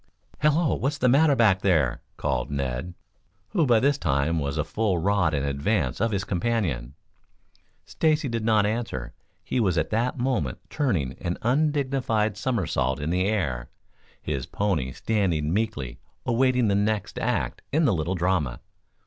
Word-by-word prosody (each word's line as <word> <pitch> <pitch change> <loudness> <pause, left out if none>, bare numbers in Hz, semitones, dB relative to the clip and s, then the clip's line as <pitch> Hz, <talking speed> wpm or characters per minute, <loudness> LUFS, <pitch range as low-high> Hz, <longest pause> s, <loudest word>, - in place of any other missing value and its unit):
"Hello, 150 +1 +3
what's 145 +3 -1
the 130 - +2
matter 140 +3 +5
back 105 -6 +4
there?" 80 -11 +2 0.2
called - - -1
Ned, 70 +4 -3 0.5
who 155 - +1
by 120 -2 +5
this 140 +3 +2
time 75 +2 +1
was 70 0 -2
a 75 - +1
full 100 +3 0
rod 95 0 +2
in 70 0 -1
advance 70 - 0
of 115 - +2
his 100 -3 -1
companion. 85 - -1 0.9
Stacy 155 -2 +1
did 115 -2 -2
not 110 -2 +3
answer. 105 - -3 0.3
He - - -1
was 95 -7 +1
at 80 - 0
that 120 +4 0
moment 120 - -1
turning 95 - 0
an 85 0 -2
undignified 130 -5 +1
somersault 80 - -1
in 75 +3 -2
the 90 +2 +1
air, 70 - -1 0.5
his 70 -2 -3
pony 85 -9 -1
standing 85 - 0
meekly, 100 - -2 0.3
awaiting 125 0 +2
the 100 - +2
next 100 -1 0
act - - -1
in 155 +3 +3
the 120 - +3
little 85 +2 -1
drama. 85 -9 0
100 Hz, 155 wpm, -25 LUFS, 75-120 Hz, 0.9 s, matter